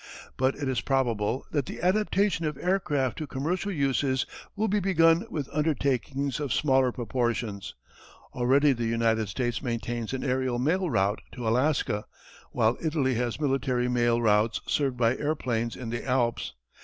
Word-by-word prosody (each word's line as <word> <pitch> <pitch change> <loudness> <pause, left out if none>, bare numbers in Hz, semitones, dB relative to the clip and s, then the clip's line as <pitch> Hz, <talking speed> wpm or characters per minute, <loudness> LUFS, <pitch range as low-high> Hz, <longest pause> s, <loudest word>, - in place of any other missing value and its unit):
But 130 +1 +1
it 145 -1 -4
is 130 -3 0
probable 125 -3 0
that 145 -4 -1
the - - -6
adaptation 195 -1 +1
of 150 -3 -4
aircraft 150 -9 0
to 155 - -4
commercial 170 +10 -2
uses 135 -4 +1 0.3
will 215 +2 0
be 210 0 +1
begun 170 0 +3
with 150 - -3
undertakings 140 -2 0
of 145 -4 -3
smaller 130 +1 +3
proportions. 120 -4 -2 0.6
Already 135 +4 +3
the 120 -2 -2
United 115 -2 +1
States 120 +5 -2
maintains 120 -2 -3
an 130 - -3
aërial 130 -2 0
mail 175 +7 +1
route 100 -4 +1 0.2
in 125 - -5
Alaska, 115 -2 +1 0.5
while 115 0 +2
Italy 150 -5 +1
has 120 +1 -2
military 135 -4 0
mail 120 -1 +2
routes 110 0 +2
served 135 -4 0
by 120 0 +3
airplanes 125 -6 -1
in 120 -3 -6
the 120 - -3
Alps. 120 - 0
130 Hz, 155 wpm, -27 LUFS, 120-150 Hz, 0.6 s, begun